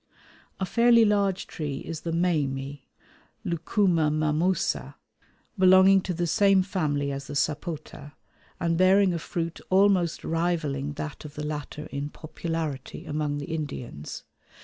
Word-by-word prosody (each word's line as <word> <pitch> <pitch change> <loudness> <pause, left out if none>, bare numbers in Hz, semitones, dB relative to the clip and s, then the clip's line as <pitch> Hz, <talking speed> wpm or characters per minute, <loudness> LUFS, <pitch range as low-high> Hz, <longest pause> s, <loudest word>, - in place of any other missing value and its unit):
A 190 - 0
fairly 235 +3 +5
large 200 -3 +1
tree 145 -4 -5
is 165 -1 -6
the 170 - -3
mamey 145 -5 -1 0.6
(Lucuma 170 -1 +1
mammosa), 155 +4 0 0.6
belonging 190 +1 +7
to 185 - -3
the 175 +1 0
same 195 +2 +4
family 150 -7 -1
as 135 0 -5
the - - -6
sapota, 150 0 -3 0.5
and 165 0 0
bearing 190 0 +5
a 170 - -2
fruit 165 +2 -4
almost 190 -3 +3
rivalling 160 -4 -1
that 150 +1 -6
of 150 -2 -10
the 150 - -4
latter 150 0 -5
in 140 +1 -3
popularity 155 -3 -5
among 150 -1 -2
the 145 +3 -5
Indians. 135 - -6
165 Hz, 130 wpm, -26 LUFS, 145-185 Hz, 0.6 s, belonging